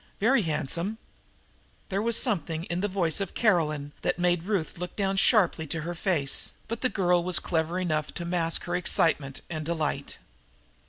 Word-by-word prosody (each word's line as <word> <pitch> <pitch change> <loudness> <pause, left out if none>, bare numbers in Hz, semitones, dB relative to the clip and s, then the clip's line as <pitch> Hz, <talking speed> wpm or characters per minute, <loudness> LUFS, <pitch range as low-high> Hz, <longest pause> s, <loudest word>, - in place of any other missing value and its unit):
Very 235 +4 +4
handsome!" 170 +5 -1 0.9
There 195 0 0
was 230 +1 +1
something 165 -4 0
in 175 0 -3
the 205 - +1
voice 185 -3 0
of 195 - -4
Caroline 155 -9 +1
that - - 0
made 175 -1 +1
Ruth 190 -5 -2
look 180 0 -5
down 195 -1 0
sharply 195 -6 +3
to 165 +3 -3
her 170 +3 -4
face, 165 -6 0
but 230 0 -4
the 255 - +2
girl 180 -4 +2
was 180 -1 +2
clever 165 +1 -1
enough 155 -4 -1
to 170 - -4
mask 170 -1 0
her 175 - -2
excitement 150 -6 +1
and 155 -2 -4
delight. 155 -3 -2
175 Hz, 170 wpm, -27 LUFS, 160-195 Hz, 0.9 s, Very